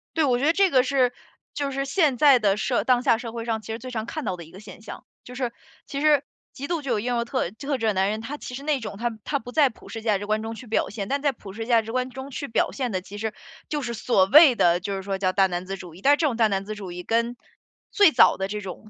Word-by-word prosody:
对， 320 - +2
我 250 -3 +2
觉 275 - -1
得 320 - +4
这 390 +1 +4
个 255 -4 +4
是 260 -2 +2 0.4
就 285 -1 -2
是 275 +1 -2
现 280 -3 +2
在 280 -2 +7
的 200 -3 +2
社 245 +2 0
当 250 -1 +3
下 230 - +3
社 230 -1 -7
会 230 -1 -5
上 220 -2 -2
其 210 - -14
实 225 - -5
最 255 - -8
常 225 -3 -4
看 310 +5 -5
到 185 - -2
的 170 - -9
一 160 - -16
个 190 - -12
现 205 0 -12
象。 215 - -9 0.2
就 250 - -11
是 245 -2 -3 0.3
其 280 - -5
实 295 -2 +4 0.3
极 280 +2 -7
度 335 -3 -1
就 270 -3 -4
有 215 - +1
英 245 +3 -1
雄 235 - 0
特 250 -8 -1
特 275 +6 -3
质 225 -2 -1
的 210 - +2
男 190 +1 +1
人， 215 +1 -3
他 285 +6 -6
其 250 - -8
实 265 - -6
那 295 -2 0
种 215 -3 -7
他 235 -1 -3
他 285 - -1
不 245 +1 -10
在 285 -1 +4
普 225 - -16
世 225 - -6
价 215 -3 +2
值 205 - -5
观 215 +1 0
中 225 - -4
去 245 +1 -11
表 220 - 0
现。 200 -2 -5
但 280 +1 0
在 285 -2 +2
普 210 -5 -12
世 225 +2 -5
价 230 -1 +4
值 225 +1 -8
观 255 +1 -1
中 265 +2 -8
去 280 +1 -5
表 - - 0
现 255 -4 -3
的， 185 - -2
其 200 +2 -10
实 220 0 -3 0.4
就 295 -1 -2
是 240 -2 -4
所 210 -4 +2
谓 285 +1 +8
的 175 -3 +3
就 195 +2 -4
是 190 - -4
说 195 0 -3
叫 185 -1 +1
大 195 -1 +4
男 180 0 -4
子 195 +1 -4
主 175 -3 -11
义， 185 - -14
但 280 +5 +5
是 290 - +3
这 315 - +2
种 245 - -1
大 225 -2 +4
男 195 -1 -1
子 215 +1 -5
主 195 -4 -7
义 180 - -6
跟 235 +3 0 0.6
最 405 -7 +6
早 245 - +5
的 190 0 -2
这 210 +1 -5
种 195 +3 -9
235 Hz, 335 characters per minute, -24 LUFS, 210-275 Hz, 0.6 s, 谓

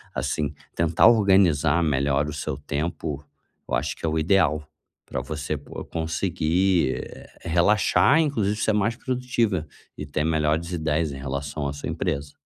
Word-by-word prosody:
assim, 75 -1 -1 0.2
tentar 80 -1 +4
organizar 95 -8 +4
melhor 70 -1 +1
o 75 - -5
seu 75 - -4
tempo, 75 -1 -4 0.5
eu - - +1
acho 70 +4 -2
que - - -18
é 80 - +1
o 80 - -1
ideal, 80 -3 +2 0.4
pra 65 - -4
você 75 +3 -4
co 75 - -9
conseguir, 85 -1 0
eh, - - -12
relaxar, 90 - +3
e 165 - +5
inclusive 110 -9 0
ser 105 +1 +1
mais 105 +2 +1
produtiva, 120 - -1 0.3
e 75 - -5
ter 75 +1 -1
melhores 80 +2 0
ideias 80 -2 0
em - - -7
relação 70 +2 -4
à 70 - -3
sua 70 - -6
empresa. 70 +1 -3
80 Hz, 160 wpm, -24 LUFS, 75-95 Hz, 0.5 s, e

